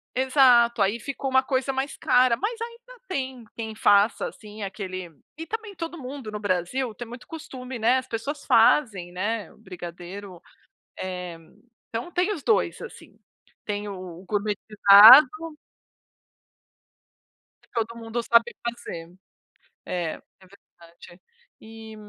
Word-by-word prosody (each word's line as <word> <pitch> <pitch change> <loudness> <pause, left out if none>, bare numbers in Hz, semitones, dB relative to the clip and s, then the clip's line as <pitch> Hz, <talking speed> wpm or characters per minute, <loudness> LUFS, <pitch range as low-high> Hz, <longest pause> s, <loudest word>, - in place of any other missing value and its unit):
exato, 250 -3 +4
aí 205 +4 +1
ficou 270 +2 -4
uma 260 0 +3
coisa 265 0 -1
mais 270 +2 -3
cara, 250 -1 +3
mas 455 +3 -3
ainda 475 +2 -9
tem 260 -7 -4
quem 220 -1 -6
faça, 205 +1 +3
assim, 210 0 -11
aquele 185 -3 -6 0.3
e 325 - -6
também 440 +1 -6
todo 335 0 -6
mundo 260 -5 -7
no 210 - -5
Brasil 205 +5 -2
tem 240 - -8
muito 240 +1 -11
costume, 260 -6 -8
né, 240 +4 +3
as 260 0 -4
pessoas 280 +6 -5
fazem 220 -6 +3
né, 205 +4 -3
o - - -24
brigadeiro, 180 -1 -9 0.6
eh, 180 -2 -6 0.5
então 230 +9 -5
tem 365 +4 +1
os 310 - -6
2 440 - +1
assim, - - -12 0.5
tem 205 0 -4
o 185 -2 -9
gourmetizado 210 +5 +7 2.3
que - - -29
todo 230 0 -2
mundo 230 +1 -4
sabe 235 +1 +3
fazer, 205 -8 -6 0.8
é, 175 -3 -3 0.2
é 190 - -18
verdade, 175 -2 -18 0.4
e, 220 0 -11
225 Hz, 130 wpm, -25 LUFS, 200-260 Hz, 2.3 s, gourmetizado